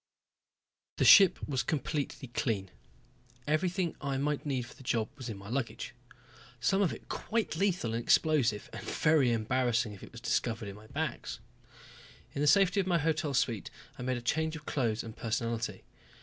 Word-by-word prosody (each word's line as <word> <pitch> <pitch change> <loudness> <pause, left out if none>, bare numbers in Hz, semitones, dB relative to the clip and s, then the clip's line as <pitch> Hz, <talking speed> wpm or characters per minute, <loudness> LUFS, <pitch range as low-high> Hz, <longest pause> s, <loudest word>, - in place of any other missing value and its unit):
The - - +2
ship 195 -4 +9
was 130 -4 0
completely 145 0 -3
clean. 105 -6 -1 0.7
Everything 170 +3 0
I 140 -2 -1
might 150 +2 -1
need 130 -3 0
for 120 - -12
the - - -17
job 115 -3 0
was 130 -4 -7
in 105 - -5
my 100 0 -11
luggage. 120 +1 -3 0.7
Some 195 +11 +2
of 190 - +3
it - - -9
quite 225 -1 -2
lethal 180 - 0
and 115 - -1
explosive, 130 -7 +3
and - - -6
very 150 -5 +3
embarrassing 120 0 +1
if 100 - -12
it - - -11
was 120 - -9
discovered 115 -2 -1
in 100 - -8
my 105 +1 -14
bags. - - -4 0.9
In 140 - -2
the 150 - +2
safety 195 +5 +5
of 190 - 0
my 175 -2 +3
hotel 155 -2 0
suite 115 -5 0 0.3
I - - -4
made 130 0 -1
a - - -5
change 160 +5 0
of 155 -1 -9
clothes 115 -6 0
and 115 -1 -8
personality. 115 -3 -2
130 Hz, 180 wpm, -31 LUFS, 115-155 Hz, 0.9 s, ship